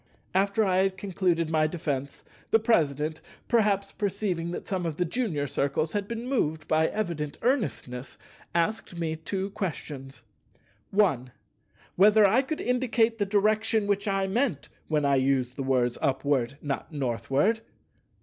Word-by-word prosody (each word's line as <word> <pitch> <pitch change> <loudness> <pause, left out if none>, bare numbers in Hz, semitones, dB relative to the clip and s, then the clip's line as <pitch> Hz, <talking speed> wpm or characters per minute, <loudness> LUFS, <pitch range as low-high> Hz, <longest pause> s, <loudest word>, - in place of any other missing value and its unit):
After 200 +3 +2
I 185 -1 +2
had 190 0 +2
concluded 180 -5 0
my 155 -1 +3
defence, 145 -5 -4 0.3
the - - +6
President, 155 - +1 0.3
perhaps 205 -4 +2
perceiving 195 -4 -2
that 175 - -6
some 185 -2 -2
of 155 -2 -4
the 180 - +1
junior 175 - -1
Circles 145 +3 -1
had 205 -1 -2
been 235 +2 -5
moved 160 - -1
by 160 +1 +3
evident 170 -8 -3
earnestness, 140 - -1 0.4
asked 175 +1 0
me 160 -2 -1
two 190 +5 -4
questions:— 140 - -5 0.7
1. 150 - +2 0.7
Whether 210 +2 +7
I 225 +7 +4
could 305 +3 -4
indicate 235 -2 +1
the 205 - +1
direction 215 +1 +2
which 200 0 0
I 195 -1 +1
meant 205 - -1 0.2
when 150 -2 +1
I 140 -1 +4
used 130 -2 +1
the - - -4
words 125 -2 +1
"Upward, 135 -1 0
not 145 +2 -3
Northward"? 140 - 0
175 Hz, 145 wpm, -27 LUFS, 145-210 Hz, 0.7 s, Whether